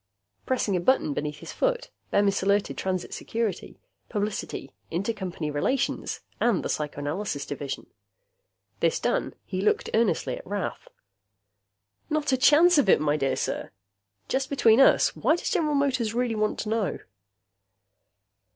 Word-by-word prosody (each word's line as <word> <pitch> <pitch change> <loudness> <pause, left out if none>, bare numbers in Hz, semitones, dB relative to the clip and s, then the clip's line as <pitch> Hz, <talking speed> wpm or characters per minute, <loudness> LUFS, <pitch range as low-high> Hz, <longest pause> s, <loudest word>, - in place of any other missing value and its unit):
Pressing 240 -6 +1
a - - +2
button 175 - +2
beneath 150 +1 -4
his - - -8
foot, - - -1 0.2
Bemis 200 -1 +2
alerted 200 +1 +1
Transit 185 -2 -3
Security, 225 -3 -3 0.3
Publicity, 210 -1 -3 0.2
Intercompany 180 -5 -3
Relations, 255 - -1 0.2
and 235 -6 +2
the - - -3
Psychoanalysis 145 +3 -3
Division. 140 -1 -5 0.9
This - - +2
done, - - -1
he 185 - -3
looked 210 - +1
earnestly 220 -7 +1
at - - -12
Rath. 200 0 -4 1.2
"Not 300 -2 0
a 260 - +3
chance 310 +5 +6
of 250 - +2
it, - - +6
my 150 -1 +1
dear 135 -3 0
sir. - - -3 0.6
Just 265 0 -1
between 240 -4 +4
us, - - +5
why 315 - +3
does 345 - -3
General 305 -3 +1
Motors 255 -6 +1
really 245 -1 +1
want 215 -1 0
to 210 - -4
know?" 220 -3 -1
210 Hz, 140 wpm, -26 LUFS, 175-260 Hz, 1.2 s, chance